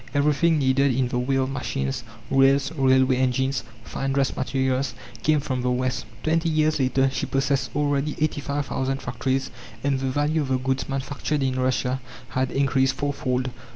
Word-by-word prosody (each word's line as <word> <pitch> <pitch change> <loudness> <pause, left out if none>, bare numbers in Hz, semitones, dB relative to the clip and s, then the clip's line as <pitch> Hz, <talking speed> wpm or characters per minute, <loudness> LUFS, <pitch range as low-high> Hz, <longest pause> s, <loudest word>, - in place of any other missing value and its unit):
Everything 150 +3 +3
needed 135 -1 +3
in 130 -1 +1
the 125 - -1
way 130 +2 0
of 135 0 +1
machines, 110 - -2 0.3
rails, 135 +1 +4
railway 130 -3 +3
engines, 130 +1 +1 0.2
fine 135 +2 -3
dress 135 -1 +1
materials, 130 0 0 0.3
came 155 +5 +3
from 130 -3 -2
the 125 - 0
West. 130 +1 -1 0.2
Twenty 165 +1 +1
years 155 -1 +2
later 135 0 +2
she 135 - -2
possessed 135 0 0
already 145 0 0
85,000 140 -3 -1
factories, 130 +1 -2 0.3
and 140 -1 +1
the 135 0 -1
value 145 +4 +1
of 140 - -2
the 130 0 +1
goods 130 +1 -2
manufactured 140 +1 -2
in 130 -1 0
Russia 130 0 0 0.3
had 130 0 0
increased 135 -1 +2
fourfold. 130 -3 -1
135 Hz, 160 wpm, -24 LUFS, 130-140 Hz, 0.3 s, rails